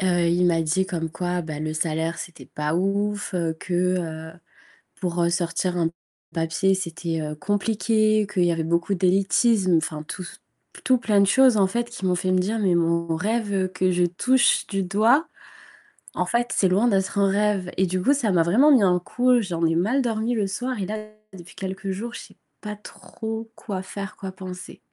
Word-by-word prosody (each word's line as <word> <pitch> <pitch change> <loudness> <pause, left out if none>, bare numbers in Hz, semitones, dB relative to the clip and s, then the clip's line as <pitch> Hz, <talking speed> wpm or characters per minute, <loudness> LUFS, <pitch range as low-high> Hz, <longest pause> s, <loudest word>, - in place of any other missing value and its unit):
Heu, 175 -2 +2
il 180 +1 +3
m'a 165 -1 +2
dit 175 +5 0
comme 165 -3 -3
quoi, 180 +1 -2
bah, 155 -2 -6
le 155 0 -3
salaire 160 +1 -1
c'était 175 - -9
pas 150 +1 -3
ouf, 200 +2 -1 0.2
que, 180 - -7 0.3
heu, 160 -1 -6 0.7
pour, 175 -1 -1
heu, 170 - +2
sortir 175 +1 -1
un 165 -1 +1 0.4
papier, 165 +3 +1
c'était, 170 -3 -3
heu, 150 0 -4
compliqué, 215 +3 +1
qu'il 180 -4 +2
y 170 - +3
avait 165 -1 -2
beaucoup 170 +4 0
d'élitisme. 190 +1 +3
Enfin, 155 -1 -3
tout 185 - -6
ce - - -10 0.5
tout 255 - +4
plein 210 -4 +2
de - - +5
choses 260 +3 +5
en 195 -2 +4
fait, 235 +4 -2
qui 235 -5 -6
m'ont 180 - +2
fait 185 +1 -1
me 185 - +3
dire: 215 +5 -1
«Mais 185 -4 +2
mon 170 -1 +1
rêve 200 0 -1
que 185 0 +1
je 180 0 +2
touche 250 +9 +2
du 195 -1 -1
doigt, 220 - +3 0.9
en - - 0
fait 240 0 0
c'est 190 - +3
loin 200 +6 +2
d'être 195 -2 0
un 200 - +4
rêve» 200 -2 +1
et 190 - +3
du 185 0 -2
coup 275 +9 +4
ça 235 -8 0
m'a 170 -2 +3
vraiment 245 - +4
mis 255 -6 +6
un 180 -2 +4
coup. 245 +7 +2
J'en 175 -5 -3
ai 165 - +2
mal 220 +11 +2
dormi 225 0 -1
le 210 -4 0
soir, 245 +4 -3
et - - -1
là 215 - -3 0.4
depuis 180 -2 -12
quelques 195 +1 -5
jours, 225 +6 -5
je - - -6
sais - - -15 0.2
pas 210 0 -5
trop 220 +2 -7
quoi 195 -4 -5
faire, 195 0 -7
quoi 195 -1 -6
penser. 185 0 -9
190 Hz, 200 wpm, -24 LUFS, 170-215 Hz, 0.9 s, mis